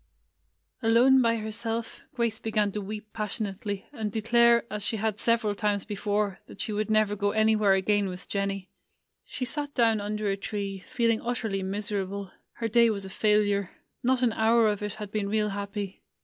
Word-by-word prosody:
Alone 245 +3 +5
by 230 -1 +3
herself, 225 +1 -4
Grace 235 -3 0
began 215 -2 0
to 210 - -4
weep 210 +1 -7
pas 215 -3 -3
sionately, 200 -1 -4
and 220 -5 -3
declare, 235 +2 +4
as 210 - -3
she 220 - -1
had 215 0 -1
several 230 -3 +2
times 205 -1 -1
before, 205 -1 -1
that - - -13
she 215 - -2 0.2
never 215 -1 +3
would 205 - -6
go 205 0 +2
any 220 0 +4
where 210 -2 +4
again 200 +1 +2
with 180 0 -8
Jennie. 195 -1 -2 0.5
She 255 - -4
sat 290 +3 -2
down 225 -4 +3
under 210 +1 -2
a 195 - +1
tree, 195 -1 -4
feeling 230 -2 +1
utterly 225 -5 -2
miserable. 200 0 -3 0.2
Her 230 - -3
day 235 +1 +5
was 200 -3 -2
a 190 - -8
failure. 205 -2 +2 0.3
Not 255 +1 +2
an 235 -3 +3
hour 225 +1 +4
of 205 -1 -2
it 210 -1 -3
had 210 -2 -7
been 210 -2 -1
real 210 0 +1
happy. 200 -1 -5
210 Hz, 185 wpm, -27 LUFS, 200-225 Hz, 0.5 s, Alone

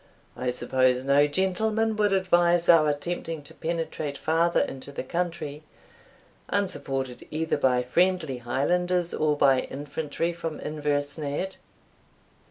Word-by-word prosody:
I 125 - -2
suppose 130 0 +2
no 140 +1 +5
gentleman 215 +7 0
would 210 -1 +2
advise 175 -2 +3
our 155 -3 +6
attempting 160 +1 -3
to - - -8
penetrate 160 -3 -3
farther 165 +2 +2
into 135 +1 -5
the 140 - -5
country, 165 -1 -3 0.9
unsupported 140 -10 -2
either 160 +1 -1
by 125 -1 +2
friendly 165 0 +1
Highlanders, 175 +8 0
or 150 -1 +1
by 135 -2 +5
infantry 150 +5 -3
from 165 -2 -5
Inversnaid?" 150 +3 -2
155 Hz, 115 wpm, -26 LUFS, 140-175 Hz, 0.9 s, our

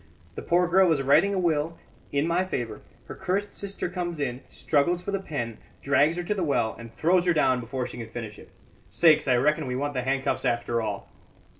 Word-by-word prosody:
The - - -6
poor 175 +1 +2
girl 185 0 +4
is 140 -4 +1
writing 150 +9 +4
a 200 - -1
will 165 -2 0 0.3
in 140 +1 +1
my 170 +2 +1
favour; 120 -12 -4 0.2
her - - -8
cursed 195 +2 -2
sister 200 -2 -4
comes 175 -2 -4
in, 130 -2 -2
struggles 170 +4 0
for 200 - -3
the 195 - -1
pen, 120 - -5 0.2
drags 145 +4 +3
her 175 - -2
to 190 - -1
the 190 -3 -2
well, 125 -7 0
and 115 -1 -10
throws 180 +2 +2
her 175 - +4
down 130 -4 +3
before 125 +2 -4
she - - -8
can 115 -2 -7
finish 110 -3 -7
it. - - -14 0.4
Sakes! 155 - +4
I 125 - +4
reckon 150 +3 +1
we 125 - -2
want 145 +2 -2
the 130 - -1
handcuffs 135 +2 -1
after 120 0 0
all." 110 - -4
150 Hz, 215 wpm, -26 LUFS, 125-175 Hz, 0.4 s, girl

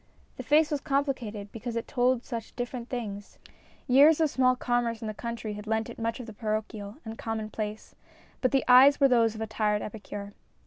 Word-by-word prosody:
The - - -4
face 300 +1 +3
was 290 -2 -1
complicated 260 -8 -2
because 230 +1 -6
it 230 - -3
told 250 -1 +1
such 230 -3 -6
different 245 0 -5
things 205 -5 -6 0.5
years 285 +5 +6
of 315 -3 +2
small 255 -1 +3
commerce 240 -2 -1
in - - -3
the 215 - -3
country 230 -1 -5
had 210 +1 -8
lent 220 0 -1
it - - -11
much 230 +1 -2
of 250 - -6
the 220 - -9
parochial 215 0 -4
and 220 - -5
the - - -13
com 225 0 -3
monplace, 215 0 -5 0.5
but 255 - +3
the 270 0 +1
eyes 265 +3 +7
were 275 - +6
those 230 -3 +3
of 220 - -7
a - - 0
tired 210 -1 0
epicure. 205 -1 -7
230 Hz, 210 wpm, -28 LUFS, 215-255 Hz, 0.5 s, eyes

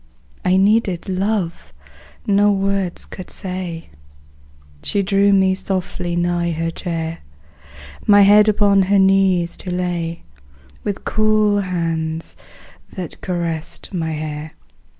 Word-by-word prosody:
I 185 +1 +3
needed 200 -2 +2
love 190 -2 -2 0.5
no 205 -1 +4
words 195 -2 -1
could 185 - -10
say; 180 - -6 0.9
She 200 - 0
drew 200 +1 +3
me 190 -1 +4
softly 185 -2 -3
nigh 175 0 0
her 165 +1 -2
chair, 165 -2 -4 0.9
My 205 -1 +7
head 210 +2 +6
upon 200 -1 +4
her 195 +2 +3
knees 190 -3 +3
to 185 - -7
lay, 175 -2 -2 0.6
With 200 -2 -4
cool 215 -1 +2
hands 165 -3 -3 0.6
that 180 -4 -7
caressed 170 -1 -4
my 160 -3 -2
hair. 155 0 -5
185 Hz, 110 wpm, -19 LUFS, 170-200 Hz, 0.9 s, My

